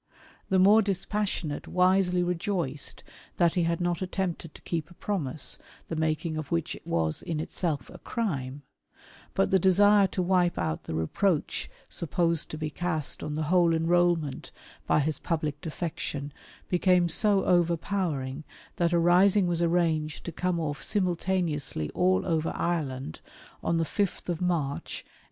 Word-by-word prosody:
The 190 - +3
more 205 +4 +6
dispassionate 195 -5 -2
wisely 180 0 +3
rejoiced 175 -5 -2 0.3
that 170 -2 +3
he 175 -2 +1
had 170 0 0
not 175 0 -1
attempted 180 -3 -3
to - - -13
keep 165 -3 -3
a 175 - -16
promise, 155 -10 -1 0.3
the 165 - -2
maknig 155 0 -1
of 155 - -6
which 85 - -1
was 80 -2 -1
in 160 -2 -3
itself 155 -2 -2
a - - -11
crime; 145 - -3 0.7
but 195 - +2
the 190 - +5
desire 200 +2 +5
to 185 - -2
wipe 180 -1 +2
out 80 - -2
the 80 - -4
reproach 150 - 0 0.2
supposed 170 0 0
to 155 - -6
be 155 -1 -3
cast 160 -2 -2
on 150 - -4
the 155 - -1
whole 170 -2 +4
enrolment 165 -3 +1 0.4
by - - +3
his 155 +1 -1
public 155 -3 -2
defection 150 -4 -4 0.3
became 180 -1 +3
so 195 +3 +4
overpowering, 170 -5 0 0.3
that 170 0 +1
a - - +4
rising 180 +3 +5
was 175 -1 0
arranged 165 -3 +1
to 170 - -5
come 180 +1 -1
off 145 -3 -3
simultaneously 175 - -1
all 185 +1 +2
over 160 -2 0
Ireland 135 - -2 0.4
on 170 - +1
the 165 - +2
5th 175 -1 -2
March, 165 -6 -2
1867. - - -31
170 Hz, 150 wpm, -28 LUFS, 155-185 Hz, 0.7 s, more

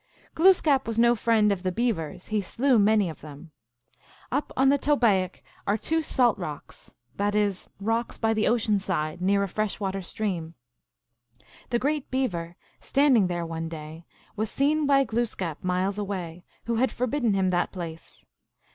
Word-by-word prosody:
Glooskap 320 -7 +4
was 230 -1 -3
no 235 +1 +5
friend 220 -2 +2
of 195 -2 -1
the 185 0 -1
Beavers; 180 -7 -2
he 215 -1 +1
slew 245 +5 +2
many 210 -1 +4
of 160 - -8
them. 150 +2 -11 0.8
Up 280 +4 -1
on 265 +1 +5
the 285 +1 +3
Tobaic 215 - +1 0.2
are 205 +2 +2
two 320 +9 0
salt 245 -7 +2
water 175 - -3
rocks 145 - -13 0.2
(that 205 +1 0
is, 205 -3 0
rocks 225 +3 -1
by 225 -1 +1
the 215 -1 +1
ocean 215 -3 +2
side, 170 -4 -3
near 200 +2 +2
a - - -1
fresh 215 +3 -2
water 195 -1 -2
stream). 175 -4 -4 1.1
The 240 - +1
Great 290 +3 -1
Beaver, 175 -11 -2 0.2
standing 265 -8 +3
there 175 -1 -2
one 165 0 -4
day, 160 +1 -9 0.3
was 215 0 -2
seen 295 +2 +1
by 275 -1 +5
Glooskap 215 - -2
miles 185 +2 0
away, 180 -4 -5 0.2
who 235 -1 -1
had 250 0 +2
forbidden 245 -3 0
him 190 -1 +1
that 175 -1 0
place. 165 -3 -9
205 Hz, 165 wpm, -26 LUFS, 180-240 Hz, 1.1 s, no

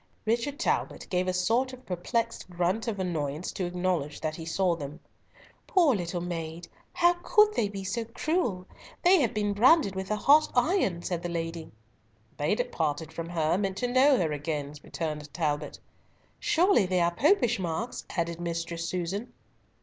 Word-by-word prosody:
Richard 235 +6 0
Talbot 340 - -1
gave 180 0 +1
a - - +2
sort 225 +9 +1
of 255 0 -12
perplexed 230 +5 -2
grunt 180 +6 -1
of 220 -3 -2
annoyance 160 -3 -2
to 185 - -3
acknowledge 175 -4 -1
that 155 -1 -3
he 165 - -7
saw 180 +1 +1
them. 145 -1 -7 0.7
"Poor 335 -9 +4
little 175 -2 -3
maid! 170 -1 -5 0.2
how 345 0 +4
could 425 +2 +4
they 210 - 0
be 195 -1 -6
so 200 +5 -2
cruel? 235 - -1 0.4
They 365 -1 +6
have 235 - +1
been 205 -1 0
branded 245 - +5
with 190 0 -4
a 215 - +1
hot 290 +8 +5
iron," 245 - +2
said 175 -2 -2
the 175 - -4
lady. 165 -1 -4 0.7
"They 150 +7 +1
that 245 +2 -2
parted 160 0 -2
from 165 +1 -5
her 165 +1 +1
meant 195 -2 -2
to 245 - 0
know 260 +2 +5
her 165 -7 0
again," 150 -1 -3
returned 150 -2 -5
Talbot. 150 -3 -1 0.6
"Surely 345 - +3
they 185 0 +1
are 170 0 +2
Popish 250 - +3
marks," 185 +7 -3
added 170 0 -1
Mistress 170 0 -3
Susan. 185 +6 -3
185 Hz, 170 wpm, -28 LUFS, 165-235 Hz, 0.7 s, They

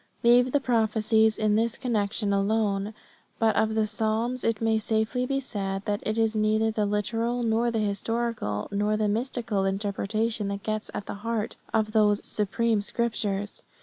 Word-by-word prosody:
Leave 245 +2 +5
the 285 - +3
prophecies 220 -3 +2
in 215 -1 +2
this 230 +1 +1
connection 210 -4 0
alone; 200 0 0 0.4
but 225 -1 +2
of 220 0 +1
the 220 -1 +2
psalms 225 +3 -1
it 225 -2 0
may 225 -1 +2
safely 220 +3 0
be 275 +1 0
said 195 -6 -4
that 205 -1 -1
it 215 +1 -2
is 225 -1 +2
neither 215 +1 +2
the 215 -1 0
literal 230 +4 -1
nor 230 +1 +2
the 230 - -2
historical 215 - -2
nor 210 +1 +1
the 215 -1 +1
mystical 225 -2 -1
interpretation 205 +2 -1
that 200 0 -4
gets 215 0 -3
at 205 - -4
the - - -5
heart 230 -1 -2 0.2
of 215 -1 +1
those 210 -2 +3
supreme 215 +1 0
scriptures. 205 -2 -2
220 Hz, 165 wpm, -26 LUFS, 205-230 Hz, 0.4 s, Leave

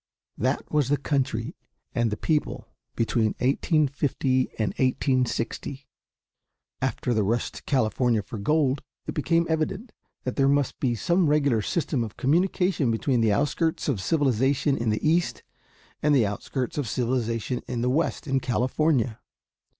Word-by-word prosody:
That 130 +5 -1
was 145 -4 +2
the 145 - +3
country 135 - -1 0.4
and 120 -3 +1
the 105 - -3
people 155 +4 -1 0.3
between 115 -1 +1
1850 135 -2 +1
and 110 -3 0
1860. 130 +1 0 1.0
After 125 -1 -1
the 110 - +2
rush 115 +4 0
to - - -10
California 120 -3 +1
for 110 - -7
gold, 140 +4 +1 0.2
it - - -4
became 165 +2 +1
evident 185 +8 -2 0.3
that 130 - -4
there 135 - +4
must 140 0 +1
be 125 -3 +1
some 170 - +2
regular 140 -6 +2
system 145 - -1
of 110 -2 -8
communication 180 0 +1
between 115 +2 +1
the 110 -2 +3
outskirts 150 +7 0
of 125 -10 0
civilization 135 - +2
in 115 -3 -1
the 110 +7 0
East, 170 +2 +1 0.6
and 150 -1 +3
the 120 -5 +4
outskirts 130 +9 -3
of 130 -7 -2
civilization 120 0 -1
in 120 -2 -3
the 125 - +1
West 160 +5 0
in 135 -2 +1
California. 130 -1 0
130 Hz, 145 wpm, -26 LUFS, 115-150 Hz, 1.0 s, there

